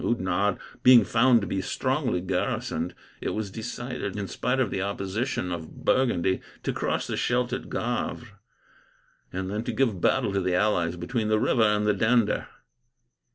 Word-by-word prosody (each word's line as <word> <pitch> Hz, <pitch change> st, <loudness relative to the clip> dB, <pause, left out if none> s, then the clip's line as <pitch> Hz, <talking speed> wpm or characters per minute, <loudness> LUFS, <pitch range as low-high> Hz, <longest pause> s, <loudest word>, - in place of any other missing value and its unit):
Oudenarde 100 Hz, -2 st, +1 dB, 0.2 s
being 125 Hz, -2 st, +8 dB
found 120 Hz, 0 st, +4 dB
to -, -, -2 dB
be 95 Hz, +1 st, -2 dB
strongly 130 Hz, -, -1 dB
garrisoned, 90 Hz, -2 st, -2 dB, 0.3 s
it -, -, -2 dB
was 105 Hz, -2 st, -3 dB
decided, 115 Hz, -1 st, -5 dB
in 100 Hz, -2 st, -3 dB
spite 125 Hz, +6 st, -1 dB
of 125 Hz, -6 st, +1 dB
the 95 Hz, -, -1 dB
opposition 100 Hz, +2 st, -2 dB
of 80 Hz, -2 st, -7 dB
Burgundy, 95 Hz, -8 st, +2 dB, 0.2 s
to -, -, -1 dB
cross -, -, -1 dB
the -, -, -3 dB
Scheldt 125 Hz, 0 st, 0 dB
at -, -, -4 dB
Gavre, 120 Hz, +1 st, -2 dB, 1.0 s
and 95 Hz, +1 st, -3 dB
then 105 Hz, +2 st, -2 dB
to 120 Hz, -, -2 dB
give 115 Hz, -6 st, 0 dB
battle 100 Hz, -, +2 dB
to 100 Hz, -, +1 dB
the 90 Hz, -1 st, 0 dB
allies 90 Hz, -4 st, +1 dB
between 105 Hz, +6 st, -2 dB
that 110 Hz, 0 st, +3 dB
river 115 Hz, -, +2 dB
and 105 Hz, -1 st, +3 dB
the 105 Hz, -, +3 dB
Dender. 110 Hz, +1 st, +2 dB
105 Hz, 165 wpm, -26 LUFS, 95-120 Hz, 1.0 s, being